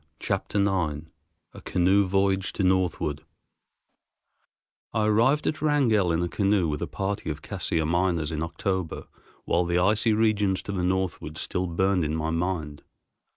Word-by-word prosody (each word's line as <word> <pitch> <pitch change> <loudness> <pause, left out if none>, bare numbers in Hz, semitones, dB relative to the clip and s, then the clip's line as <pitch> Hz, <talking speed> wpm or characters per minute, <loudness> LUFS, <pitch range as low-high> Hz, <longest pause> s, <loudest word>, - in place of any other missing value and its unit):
Chapter - - -2
IX 80 -6 -1 0.4
A - - -11
Canoe 95 +2 +2
Voyage 95 0 +1
to 100 - -2
Northward 90 -5 0 1.7
I 110 -1 +2
arrived 115 +8 +3
at 155 - -1
Wrangell 120 - +2
in 85 +1 +1
a - - 0
canoe 100 -1 +1
with 75 -1 -3
a - - -2
party 100 -3 -3
of 75 -1 -5
Cassiar 80 -1 -1
miners 85 -1 0
in 80 -1 -3
October 90 +1 -3 0.4
while 90 - +2
the 85 0 0
icy 105 +5 +3
regions 105 -3 +1
to - - -5
the 95 -2 -2
northward 95 -1 -2
still 90 0 -2
burned 95 +1 +1
in 75 0 -1
my 80 0 -2
mind. 80 -4 -2
95 Hz, 155 wpm, -26 LUFS, 80-100 Hz, 1.7 s, arrived